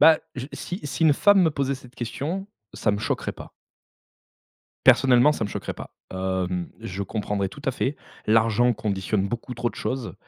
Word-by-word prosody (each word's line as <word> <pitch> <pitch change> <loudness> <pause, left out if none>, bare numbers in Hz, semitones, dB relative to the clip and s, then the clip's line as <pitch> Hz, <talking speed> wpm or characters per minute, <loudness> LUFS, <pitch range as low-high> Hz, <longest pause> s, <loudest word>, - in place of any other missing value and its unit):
Bah, 160 -1 +8 0.2
je 130 0 -5
si 180 +3 -5
si 140 +1 -3
une 155 -2 +7
femme 205 +6 +5
me 160 - +4
posait 140 -2 0
cette 125 -2 -13
question, 150 - -3 0.3
ça 105 - +1
me 100 - -1
choquerait - - -2
pas. - - -11 1.4
Personnellement, 130 +2 +7
ça 130 - -3
me 105 - 0
choquerait - - -4
pas. - - -9 0.2
Hem, 95 -1 -1
je 95 +2 -4
comprendrais 100 -1 -2
tout 140 - -12
à 135 - +1
fait. 135 +3 -1 0.3
L'argent 115 +2 +4
conditionne 100 -2 -1
beaucoup 120 +3 -4
trop 120 0 -1
de - - -12
choses, 130 -3 -3
120 Hz, 180 wpm, -25 LUFS, 100-140 Hz, 1.4 s, Bah